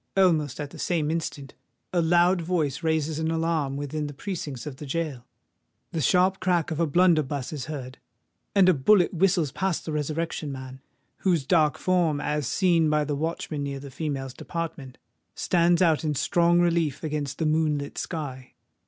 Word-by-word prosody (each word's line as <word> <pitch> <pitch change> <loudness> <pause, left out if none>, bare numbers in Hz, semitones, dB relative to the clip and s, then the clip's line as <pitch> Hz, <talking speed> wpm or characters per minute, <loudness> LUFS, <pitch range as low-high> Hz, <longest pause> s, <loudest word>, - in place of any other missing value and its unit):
Almost 160 -8 +3
at 145 -1 -5
the - - -11
same 160 -4 0
instant, 150 -4 -4 0.4
a 175 - +3
loud 175 +2 +3
voice 160 -5 -1
raises 160 -1 0
an 160 0 0
alarm 160 -4 0
within 145 +1 -3
the 145 - -8
precincts 150 - -5
of 145 -3 -7
the 150 0 -8
gaol: 145 -4 -3 0.7
the 165 - -2
sharp 185 +7 +3
crack 180 -4 +1
of 160 - -3
a 170 - +2
blunderbuss 155 -5 +2
is 140 -5 -4
heard—and 150 +7 -3
a 185 - +6
bullet 175 +7 +4
whistles 175 -4 +2
past 190 +2 -2
the 160 - -4
Resurrection 155 0 -2
Man, 130 -1 -8 0.4
whose 170 -7 +1
dark 155 -1 +3
form, 175 -5 +1
as 150 -2 -1
seen 170 -3 +3
by 150 0 +2
the 145 0 -2
watchman 155 0 -3
near 140 -1 -3
the 140 0 -10
females' 135 -4 -4
department, 150 -7 -6 0.4
stands 175 0 +3
out 160 -3 +3
in 150 -2 0
strong 170 +4 +3
relief 170 -5 +1
against 150 -3 -3
the 160 - -1
moon 155 -1 +2
lit 140 0 -6
sky. 135 -7 -6
155 Hz, 170 wpm, -26 LUFS, 145-170 Hz, 0.7 s, a